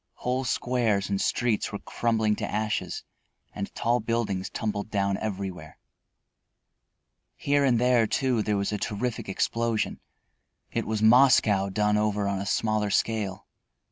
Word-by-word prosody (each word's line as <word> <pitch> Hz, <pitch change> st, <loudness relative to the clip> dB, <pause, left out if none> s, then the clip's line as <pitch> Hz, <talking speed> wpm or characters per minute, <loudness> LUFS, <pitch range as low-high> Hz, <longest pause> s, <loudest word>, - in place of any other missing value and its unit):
Whole 130 Hz, +1 st, -2 dB
squares 115 Hz, -5 st, 0 dB
and 100 Hz, -, 0 dB
streets 120 Hz, -4 st, 0 dB
were 100 Hz, -, -3 dB
crumbling 110 Hz, -1 st, 0 dB
to -, -, -4 dB
ashes 105 Hz, -5 st, -2 dB, 0.5 s
and 100 Hz, -1 st, -5 dB
tall 120 Hz, +1 st, +1 dB
buildings 105 Hz, -4 st, -2 dB
tumbled 105 Hz, -1 st, -3 dB
down 100 Hz, -2 st, 0 dB
everywhere. 95 Hz, -6 st, -5 dB, 1.6 s
Here 145 Hz, 0 st, +1 dB
and 130 Hz, -4 st, +3 dB
there, 125 Hz, -2 st, +3 dB
too, 125 Hz, -1 st, +1 dB
there 105 Hz, -1 st, 0 dB
was 100 Hz, +1 st, -1 dB
a 105 Hz, -, -2 dB
terrific 115 Hz, +1 st, -3 dB
explosion. 115 Hz, +3 st, -1 dB, 0.7 s
It -, -, -2 dB
was 110 Hz, 0 st, -1 dB
Moscow 110 Hz, -5 st, +5 dB
done 105 Hz, +1 st, +1 dB
over 105 Hz, -1 st, 0 dB
on 100 Hz, -1 st, -1 dB
a 100 Hz, -, -4 dB
smaller 110 Hz, -1 st, 0 dB
scale. 105 Hz, -1 st, -1 dB
110 Hz, 140 wpm, -27 LUFS, 100-115 Hz, 1.6 s, Moscow